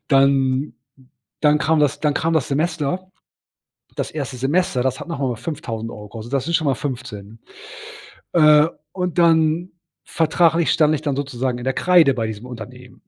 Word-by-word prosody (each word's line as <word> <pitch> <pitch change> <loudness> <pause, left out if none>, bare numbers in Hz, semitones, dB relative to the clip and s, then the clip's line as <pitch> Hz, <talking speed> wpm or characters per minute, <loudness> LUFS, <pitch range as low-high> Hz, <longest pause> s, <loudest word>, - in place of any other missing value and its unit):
dann 135 0 +2 0.7
dann 150 -1 +4
kam 160 +1 +1
das 145 -3 +1
dann 150 -2 +1
kam 165 +1 0
das 155 - +1
Semester, 160 +4 -2 0.9
das - - -3
1. 140 -4 -5
Semester, 135 0 0
das 130 +1 -1
hat - - -8
noch 165 - -4
mal 125 -4 -1
5000€ 115 -8 -6
gekostet. 115 +3 -9
Das 135 - 0
sind 170 - -3
schon 160 - +1
mal 135 - +2
15. 115 -6 -7 0.9
Äh, 150 -2 +6 0.3
und 180 -2 -3
dann 165 +1 +3 0.3
vertraglich 165 +1 +2
stand 155 -1 +3
ich 155 - -3
dann 145 -3 -1
sozusagen 130 -3 -2
in 120 - -7
der 130 0 0
Kreide 170 -7 +4
bei 115 -3 -2
diesem 110 +2 -7
Unternehmen 125 +1 -11
140 Hz, 165 wpm, -21 LUFS, 125-160 Hz, 0.9 s, Äh